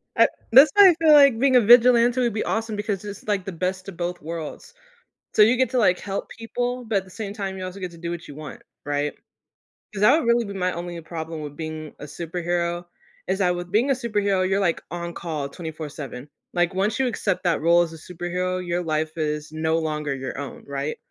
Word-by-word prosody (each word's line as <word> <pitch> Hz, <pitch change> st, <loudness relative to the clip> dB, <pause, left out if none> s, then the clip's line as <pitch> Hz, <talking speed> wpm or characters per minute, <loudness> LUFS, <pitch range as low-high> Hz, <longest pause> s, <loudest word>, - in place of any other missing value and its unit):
uh, -, -, +6 dB, 0.2 s
that's 270 Hz, +4 st, +8 dB
why 400 Hz, -2 st, +9 dB
I 345 Hz, -, +3 dB
feel 315 Hz, -2 st, +6 dB
like 280 Hz, -5 st, +7 dB
being 265 Hz, -1 st, +3 dB
a 250 Hz, -, +7 dB
vigilante 240 Hz, +2 st, +6 dB
would 240 Hz, -3 st, +1 dB
be 215 Hz, -, -1 dB
awesome 225 Hz, -1 st, -2 dB
because 205 Hz, -2 st, -3 dB
it's 205 Hz, 0 st, -8 dB
like 200 Hz, -3 st, 0 dB
the 195 Hz, -, -4 dB
best 185 Hz, +2 st, -3 dB
of 175 Hz, -, -11 dB
both 175 Hz, 0 st, -3 dB
worlds. 160 Hz, 0 st, -7 dB, 0.6 s
So, -, -, +6 dB
you 225 Hz, +4 st, +5 dB
get 255 Hz, -2 st, +1 dB
to 255 Hz, -, 0 dB
like 185 Hz, -5 st, +3 dB
help 200 Hz, -1 st, -4 dB
people, 245 Hz, +2 st, -4 dB
but 220 Hz, -3 st, +1 dB
at 190 Hz, -, -5 dB
the 185 Hz, -, -17 dB
same 210 Hz, -2 st, -6 dB
time 195 Hz, -2 st, -4 dB
you 185 Hz, -, -5 dB
also 185 Hz, +2 st, -7 dB
get 185 Hz, -1 st, -4 dB
to 170 Hz, -, -14 dB
do 170 Hz, 0 st, -5 dB
what 170 Hz, -1 st, -6 dB
you 145 Hz, -, -9 dB
want, 150 Hz, -3 st, -9 dB, 0.2 s
right? 145 Hz, 0 st, -1 dB, 0.8 s
'Cause 200 Hz, -, -5 dB
that 260 Hz, +9 st, +6 dB
would 240 Hz, -, -3 dB
really 235 Hz, 0 st, +3 dB
be 200 Hz, -, -6 dB
my 185 Hz, -1 st, -1 dB
only 175 Hz, 0 st, -6 dB
problem 160 Hz, -1 st, -6 dB
with 145 Hz, -1 st, -7 dB
being 155 Hz, -1 st, -6 dB
a -, -, -7 dB
superhero 175 Hz, +2 st, -3 dB, 0.4 s
is 190 Hz, +1 st, -1 dB
that 180 Hz, -2 st, +2 dB
with 175 Hz, 0 st, -6 dB
being 230 Hz, +7 st, +2 dB
a -, -, +5 dB
superhero, 205 Hz, -6 st, 0 dB
you're 195 Hz, +1 st, +1 dB
like 175 Hz, -4 st, 0 dB
on 170 Hz, 0 st, -5 dB
call 155 Hz, -5 st, -4 dB
24/7. 150 Hz, -5 st, -7 dB, 0.3 s
Like, 175 Hz, +1 st, +1 dB
once 205 Hz, +4 st, 0 dB
you 265 Hz, -, +2 dB
accept 190 Hz, -5 st, -1 dB
that 170 Hz, -4 st, +1 dB
role 170 Hz, +2 st, +5 dB
as 165 Hz, -1 st, -6 dB
a -, -, -9 dB
superhero, 180 Hz, +2 st, -3 dB
your 175 Hz, +1 st, -1 dB
life 155 Hz, 0 st, -2 dB
is 150 Hz, -1 st, -2 dB
no 160 Hz, +1 st, 0 dB
longer 150 Hz, -3 st, -2 dB
your 135 Hz, 0 st, -6 dB
own, 140 Hz, -2 st, -7 dB
right? 140 Hz, +2 st, -3 dB
180 Hz, 230 wpm, -24 LUFS, 160-215 Hz, 0.8 s, why